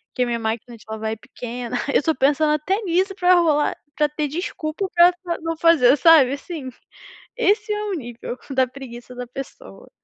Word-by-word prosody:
que 250 - +1
a - - 0
minha 235 -1 -1
máquina 230 +2 -4
de 215 - -18
lavar 220 0 -4
é - - -2
pequena, 240 +2 -7 0.2
eu - - +5
estou 320 +2 0
pensando 295 +3 +2
até 375 +7 0
nisso 375 +2 +1
pra 365 -1 +4
rolar 310 -4 +2 0.2
pra 300 0 +2
ter 300 0 -2
desculpa 325 +3 -4
pra 345 +1 +7
pra 355 -1 -5
pra - - -11
não 330 0 -3
fazer 310 -6 +5
sabe 295 -5 +6
assim, 285 -1 -6 0.7
esse 425 -1 +1
é 420 - -3
o 410 - -3
nível 240 -4 -6
da 260 -1 +2
preguiça 250 -2 -10
da 250 0 -6
pessoa. 270 - -10
300 Hz, 195 wpm, -22 LUFS, 250-345 Hz, 0.7 s, pra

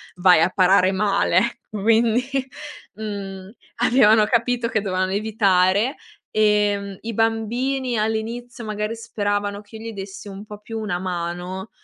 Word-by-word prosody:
vai 180 -2 +5
a 170 - +4
parare 185 0 +4
male. 195 -2 +1
Ecco 220 0 -1
quindi, 230 +2 +3 0.7
mhmm, 195 -2 -6 0.3
avevano 220 -4 +5
capito 235 +1 +1
che 220 - +1
dovevano 185 -1 -1
evitare, 200 +2 +2 0.4
ehm, 205 -2 +1
i 230 +1 -5
bambini. 235 +4 0
All'inizio 230 +3 -3
magari 215 +1 -3
speravano 205 -2 -2
che 210 +2 -16
io 225 +1 -7
gli - - -7
dessi 195 0 -8
un 195 +1 -9
po' 210 -1 -10
più 225 +1 -6
una 210 -5 -2
mano, 180 +2 -4
210 Hz, 135 wpm, -22 LUFS, 195-225 Hz, 0.7 s, vai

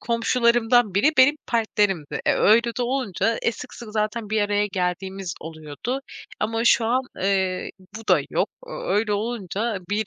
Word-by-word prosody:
komşularımdan 235 -2 +2
biri 220 +11 +4
benim 260 +3 +6
partnerimdi. 205 -8 0
E, - - +5
öyle 225 +3 +5
de - - +1
olunca 230 -4 0
e 235 - +2
sık 255 - -10
sık 235 -2 -10
zaten 215 0 -2
bir 215 -1 +2
araya 205 0 +1
geldiğimiz 190 0 -3
oluyordu 160 - -5 0.4
ama 225 +2 -1
şu 235 -1 +5
an, 250 +3 +2
eee, 190 -1 0 0.3
bu 225 - -11
da - - +5
yok. - - +1
O - - -13
öyle 215 - 0
olunca 215 -1 -2
bir 210 0 0
215 Hz, 160 wpm, -23 LUFS, 195-235 Hz, 0.4 s, benim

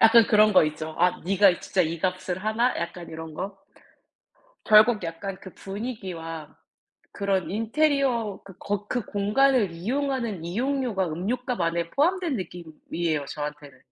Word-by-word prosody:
약간 225 0 +7
그런 215 -1 +5
거 185 - +7
있죠. 155 +1 -4
"아 180 +1 +2
네가 195 -1 +4
진짜 190 - 0
이 165 0 0
값을 185 +1 -2
하나?" 230 +3 +1
약간 170 0 -5
이런 160 0 -8
거. 195 +3 -5 1.1
결국 215 0 +6
약간 165 +4 -5
그 190 - -10
분위기와 185 -7 -6 0.6
그런 195 -2 -1
인테리어 235 -1 +1
그 195 -2 -12
거 205 0 -3
그 245 -5 -1
공간을 210 +1 +2
이용하는 235 - -2
이용료가 235 -1 -1
음료값 230 +8 -2
안에 170 0 0
포함된 340 0 +1
느낌이에요, 165 -4 -4
저한테는. 145 -2 -7
195 Hz, 295 characters per minute, -26 LUFS, 170-230 Hz, 1.1 s, 약간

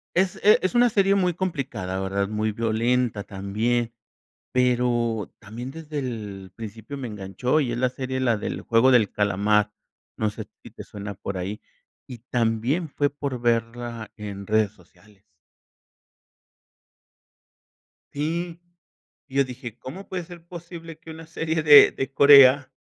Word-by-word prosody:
es, 185 0 +1
eh, 210 - +6
es 185 +6 -1
una 245 0 +5
serie 195 -2 +3
muy 180 -2 +1
complicada, 135 - -3
¿verdad?, 100 +1 -1
muy 110 0 -1
violenta, 115 0 0
también. 110 +4 -2 0.6
Pero 120 -3 +1
también, 115 +4 -8
desde 155 0 -7
el 105 -8 -6
principio 110 +4 -8
me 130 -3 -5
enganchó, 105 - -1
y 130 -5 -1
es 120 - -3
la 130 0 +1
serie, 130 0 -4
la 120 -4 +1
de - - -5
El - - -4
juego 115 +3 +4
del 115 -5 +4
calamar, 105 +1 +1 0.4
no 110 -1 0
sé - - -8 0.2
si - - -12
te - - -10
suena 100 0 -7
por 100 +1 -6
ahí. 95 +4 -4 0.5
Y 125 -2 -9
también 120 +8 0
fue 145 0 0
por 140 -3 -5
verla 115 -1 -2
en 100 -2 -7
redes 110 -1 +2
sociales. 105 -1 -23 2.9
Sí, 165 +4 -3 0.7
y 135 - -8
yo 140 - +4
dije: 125 -2 -9
"¿Cómo 185 +10 -9
puede 180 -2 -5
ser 170 -1 -13
posible 170 -2 -10
que 160 - -12
una 160 0 -10
serie 160 0 -2
de 145 -2 +9
de 135 0 -4
Corea, 140 -1 +7
120 Hz, 150 wpm, -24 LUFS, 105-145 Hz, 2.9 s, de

